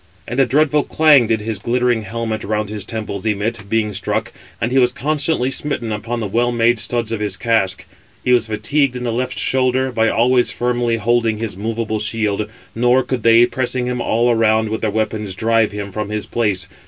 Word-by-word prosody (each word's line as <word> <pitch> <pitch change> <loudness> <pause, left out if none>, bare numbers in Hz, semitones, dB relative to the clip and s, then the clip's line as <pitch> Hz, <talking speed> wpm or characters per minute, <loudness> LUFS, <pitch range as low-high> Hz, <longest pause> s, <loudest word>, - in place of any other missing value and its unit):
And 120 - -3
a 135 - +4
dreadful 150 +3 +3
clang 150 -7 +4
did 110 -1 0
his 110 0 -4
glittering 120 -1 +1
helmet 110 +1 -4
round 105 0 -2
his 105 -2 -5
temples 105 -2 -4
emit, 105 0 -2
being 110 -1 0
struck, 100 - -2 0.3
and 120 +3 -1
he 135 - +3
was 125 -1 +4
constantly 145 -1 -1
smitten 130 -6 -2
upon 115 +3 -3
the 110 - -3
well 120 +4 +1
made 120 0 +2
studs 115 0 -2
of 115 - -2
his 105 -3 -2
casque. 100 -4 0 0.4
He 125 - +2
was 120 -2 +3
fatigued 135 +5 0
in 125 - -5
the 120 - -1
left 125 +2 -2
shoulder, 130 0 +1
by 115 -2 +2
always 120 0 +3
firmly 120 0 0
holding 115 0 +1
his 110 -3 -4
moveable 110 +1 -3
shield; 105 -1 -1 0.2
nor 125 +3 +3
could 125 -1 -3
they, 115 +1 +6
pressing 125 0 -1
him 125 0 -2
all 120 +2 +2
around 110 -1 +2
with 110 - -3
their 110 - 0
weapons, 105 -2 -2
drive 115 +1 +2
him 100 -1 -6
[from 105 +1 -4
his 105 -1 -3
place]. 100 -5 -1
115 Hz, 200 wpm, -18 LUFS, 110-125 Hz, 0.4 s, they